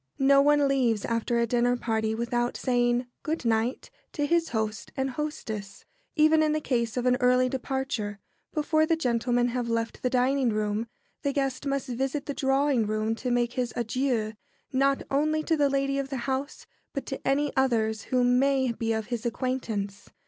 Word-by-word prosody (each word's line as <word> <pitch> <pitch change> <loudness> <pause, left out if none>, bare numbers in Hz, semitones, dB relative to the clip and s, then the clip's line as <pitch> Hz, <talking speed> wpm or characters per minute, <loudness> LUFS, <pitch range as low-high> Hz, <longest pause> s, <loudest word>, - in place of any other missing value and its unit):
No 275 +1 +5
one 290 0 +4
leaves 245 -6 +1
after 230 +1 0
a 235 - +3
dinner 245 +1 +2
party 220 -2 -1
without 240 +1 -1
saying 245 -1 +1 0.2
"Good 315 -4 -3
night" 230 +2 0 0.2
to 290 - 0
his 335 +2 +1
host 220 -2 -3
and 265 0 0
hostess. 220 -8 -5 0.3
Even 310 +1 +5
in 305 -1 +2
the 310 - +1
case 235 -5 -1
of 245 - -1
an 250 0 +4
early 250 0 +4
departure, 255 -5 -3 0.3
before 310 +1 +2
the 330 - +3
gentlemen 245 -3 +1
have 240 -1 -2
left 230 0 -2
the 250 - +1
dining 255 +1 +2
room, 215 +1 -1 0.3
the 280 - 0
guest 270 0 -1
must 275 0 -1
visit 270 +3 -2
the 285 - -3
drawing 270 -4 +2
room 215 +1 0
to 250 +3 -4
make 240 0 +1
his 250 -2 -2
adieux, 235 -2 0 0.4
not 275 +1 +2
only 310 +3 +1
to 320 - +1
the 290 -2 +3
lady 275 0 0
of 275 -1 -3
the 270 - -3
house, 270 +2 -3 0.3
but 275 - -4
to 270 - -5
any 285 +1 +1
others 225 -5 +1
who 250 -1 +1
may 260 +1 +3
be 225 -1 -1
of 220 -1 -2
his 240 -1 -4
acquaintance. 225 -5 -3
250 Hz, 180 wpm, -27 LUFS, 230-275 Hz, 0.4 s, No